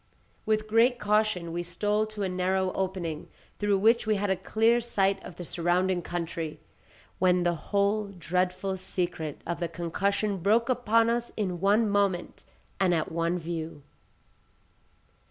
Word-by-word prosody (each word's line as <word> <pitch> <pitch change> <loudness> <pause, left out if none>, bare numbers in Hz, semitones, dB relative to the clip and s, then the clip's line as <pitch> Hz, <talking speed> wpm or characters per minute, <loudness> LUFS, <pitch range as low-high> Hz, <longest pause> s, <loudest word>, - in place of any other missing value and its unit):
With 215 0 +1
great 230 +3 +4
caution 210 -6 +1
we 175 - -1
stole 205 +5 0
to 215 -1 -5
a - - +1
narrow 185 +1 0
opening, 185 -5 -3 0.3
through 205 -1 +2
which 225 +3 +3
we 215 - +3
had 200 0 0
a - - +3
clear 225 +5 +2
sight 200 -4 0
of 180 - -9
the 175 - -7
surrounding 175 +2 +1
country, 165 -2 -4 0.6
when 180 -1 +3
the 175 0 +2
whole 200 +5 0
dreadful 185 +1 -2
secret 175 -5 -3
of 170 0 -3
the 170 - -1
concussion 195 +5 -1
broke 220 +7 +2
upon 230 -2 +3
us 240 0 -1
in 185 -5 -2
one 210 +3 +4
moment 200 -3 0 0.4
and 185 -2 +3
at 160 - -1
one 170 +2 0
view. 165 -3 -5
190 Hz, 150 wpm, -28 LUFS, 175-215 Hz, 0.6 s, great